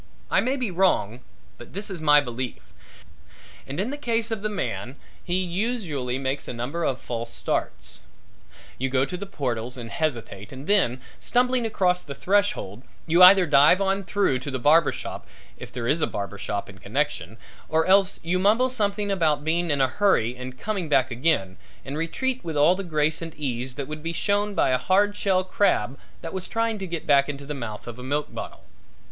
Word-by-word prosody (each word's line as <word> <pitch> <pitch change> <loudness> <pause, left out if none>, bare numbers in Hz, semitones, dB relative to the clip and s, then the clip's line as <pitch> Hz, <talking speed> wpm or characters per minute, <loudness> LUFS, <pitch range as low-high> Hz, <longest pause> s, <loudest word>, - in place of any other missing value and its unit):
I - - +4
may 255 +3 0
be 250 -7 -2
wrong 170 - +1 0.4
but 120 - -12
this 200 +2 -4
is 175 -4 -6
my 150 -1 +6
belief. 125 -1 -6 0.9
And 140 +5 -5
in 215 +7 -1
the 290 - -5
case 230 -4 0
of 220 -3 -2
the 215 - -1
man 120 - -4 0.3
he 185 +1 0
usually 175 - -2
makes 135 +1 -3
a - - -4
number 130 +9 -3
of 130 -5 0
false 115 -1 -5
starts. 120 - -3 0.8
You 130 +1 0
go 130 +1 +2
to 160 - -5
the 200 +3 -6
portals 125 -7 -3
and 115 -2 -7
hesitate 115 -9 -3
and 135 +1 -9
then, 140 - +2 0.2
stumbling 250 -1 +1
across 180 -4 +1
the 140 - -8
threshold, 185 - 0 0.2
you 170 +2 +3
either 185 0 +9
dive 150 +3 +6
on 195 0 0
through 195 -9 +1
to 125 - -6
the 130 - -2
barber 150 +5 +4
shop - - -7 0.3
if - - -10
there 120 -1 -4
is 155 +5 +2
a - - +3
barber 100 0 -5
shop 100 -1 -3
in 95 -1 -13
connection 135 +2 -2 0.3
or 160 0 +2
else 195 0 +4
you 175 +2 0
mumble 225 +7 +3
something 205 -3 -1
about 155 -6 +1
being 170 +2 0
in 145 -2 +2
a 130 - +4
hurry 130 - +2
and 130 0 -8
coming 200 -7 -3
back 130 -3 +3
again, 120 - 0 0.3
and 135 - -5
retreat 250 - -2
with 160 -3 -4
all 150 +5 +6
the 195 +1 -4
grace 155 -2 0
and 165 -1 -7
ease 130 -3 -3
that 140 -2 -4
would 155 0 -6
be 165 +2 -3
shown 205 +3 0
by - - +3
a 130 -1 +2
hard 200 +7 +2
shell 190 -3 +1
crab 185 - +1 0.3
that 165 - -6
was 190 -1 -4
trying 225 -1 -1
to 175 -4 -3
back 140 0 +3
into 140 0 -6
the 150 - -4
mouth 115 -6 -6
of 120 0 -8
a - - -8
milk 145 +3 -2
bottle. - - -7
155 Hz, 200 wpm, -25 LUFS, 130-195 Hz, 0.9 s, either